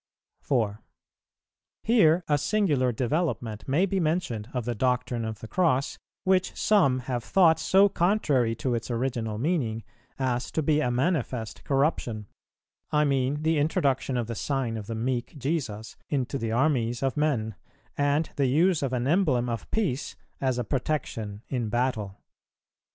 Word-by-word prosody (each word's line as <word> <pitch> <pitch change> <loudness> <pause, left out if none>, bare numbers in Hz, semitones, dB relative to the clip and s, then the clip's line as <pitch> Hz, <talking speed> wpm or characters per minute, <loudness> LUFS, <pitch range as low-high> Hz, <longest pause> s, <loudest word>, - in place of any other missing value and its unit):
4. 110 -6 -1 1.0
Here 180 -7 +4
a 145 -1 +2
singular 150 -9 +1
development 120 -3 -2
may 150 +8 +3
be 195 0 -1
mentioned 155 - -1
of 125 -3 -3
the 120 - -1
doctrine 125 0 0
of 110 -1 -5
the 110 - -7
Cross, 140 -4 +1 0.2
which 190 -1 +2
some 140 -12 +3
have 120 -1 -3
thought 170 -1 +4
so 195 +2 +5
contrary 155 - +1
to 125 +2 -2
its 115 +1 -3
original 120 -3 -2
meaning,[422:1] 120 -6 -1 0.5
as 120 +1 -3
to 160 - 0
be 150 +1 +2
a 125 - +1
manifest 125 -4 -1
corruption; 135 -7 0 0.7
I 150 0 +3
mean 140 +1 0
the 160 -1 +2
introduction 140 -3 +1
of 120 - -1
the 115 - -5
Sign 125 +1 -2
of 105 -2 -6
the 115 - -4
meek 120 +5 -2
Jesus 125 -7 -3
into 135 -1 -1
the 115 -1 -2
armies 120 -2 +1
of 135 - 0
men, 135 -8 0 0.4
and 145 +2 +1
the 140 -2 +2
use 165 +6 +3
of 135 -2 -1
an 125 -1 0
emblem 135 -7 +2
of 115 -3 -4
peace 175 - -1 0.2
as 130 -2 0
a 125 - 0
protection 115 -5 -3
in 120 -5 -2
battle. 110 -5 -1
130 Hz, 155 wpm, -27 LUFS, 115-155 Hz, 1.0 s, so